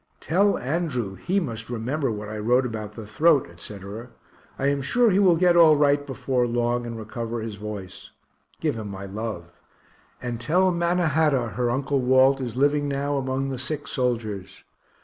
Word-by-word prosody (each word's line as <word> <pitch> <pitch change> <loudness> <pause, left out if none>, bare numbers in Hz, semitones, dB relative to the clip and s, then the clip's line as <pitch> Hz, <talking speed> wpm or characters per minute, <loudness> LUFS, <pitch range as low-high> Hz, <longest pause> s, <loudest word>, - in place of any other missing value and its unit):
Tell 200 +6 +2
Andrew 130 - -2
he 185 - -1
must 115 - -5
remember 125 +5 -2
what 105 -1 -5
I 105 0 -5
wrote 125 +4 +2
about 110 -3 -5
the 110 - -8
throat, 150 - +3
etc. 100 +6 -9 0.5
I 135 - -2
am 140 0 +1
sure 235 - +3
he 190 - +3
will 185 -4 +5
get 175 +1 +4
all 165 -3 +7
right 145 0 +2
before 130 -2 0
long, 120 0 0
and 115 -1 -5
recover 115 +1 -5
his 110 -1 -5
voice. 100 -3 -8 0.5
Give 155 -3 0
him 110 -3 -6
my 100 0 -7
love 100 -4 -5 0.7
and 120 -2 -5
tell 185 +7 +3
Mannahatta 160 -7 +1
her 120 +1 -1
Uncle 135 +3 0
Walt 130 +2 +4
is 125 -2 -4
living 145 +1 +2
now 140 +1 -1
among 135 0 -1
the 130 -2 -4
sick 150 +2 -4
soldiers. 110 -7 -3
125 Hz, 170 wpm, -24 LUFS, 110-145 Hz, 0.7 s, all